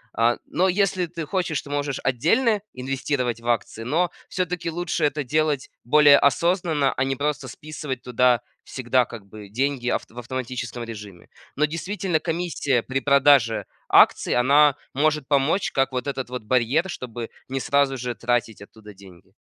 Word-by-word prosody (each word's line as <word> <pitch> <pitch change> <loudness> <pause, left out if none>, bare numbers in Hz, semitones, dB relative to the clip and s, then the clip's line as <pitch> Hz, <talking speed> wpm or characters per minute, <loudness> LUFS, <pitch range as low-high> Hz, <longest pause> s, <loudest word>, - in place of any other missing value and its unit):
А, 115 +1 +2
но 180 +4 +1
если 185 -1 +1
ты 165 -1 -6
хочешь, 165 -3 -1
то 145 - -11
можешь 145 -2 -2
отдельно 185 - +2
инвестировать 130 -2 -2
в 120 - -10
акции, 115 -1 -1
но 165 +8 0 0.2
всё-таки 180 -2 -2
лучше 170 -1 -1
это 150 0 -1
делать 150 0 0
более 145 +3 +6
осознанно, 160 0 +2
а 130 - 0
не 135 0 -1
просто 145 +2 -2
списывать 145 -4 -7
туда 125 -1 +2 0.2
всегда 130 -1 0
как 115 -4 -10
бы 105 0 -12
деньги 130 +2 -1
авт - - -2
в 120 - -9
автоматическом 125 -1 -5
режиме. 105 -6 -10 0.3
Но, 150 - +3
действительно, 170 +2 -2
комиссия 160 -7 -1
при 135 +1 -2
продаже 140 -4 +4 0.2
акций- - - +5
она 140 +3 +5 0.2
может 150 0 +1
помочь 145 +7 +1
как 135 0 +1
вот 125 -1 -3
этот 135 -3 -4
вот 125 -2 -5
барьер, 130 - +1
чтобы 120 -4 -7 0.2
не 135 +1 -2
сразу 140 0 +1
же 125 0 -3
тратить 120 -3 -1
оттуда 105 0 -13
деньги. 95 -3 -17
135 Hz, 160 wpm, -23 LUFS, 120-155 Hz, 0.3 s, более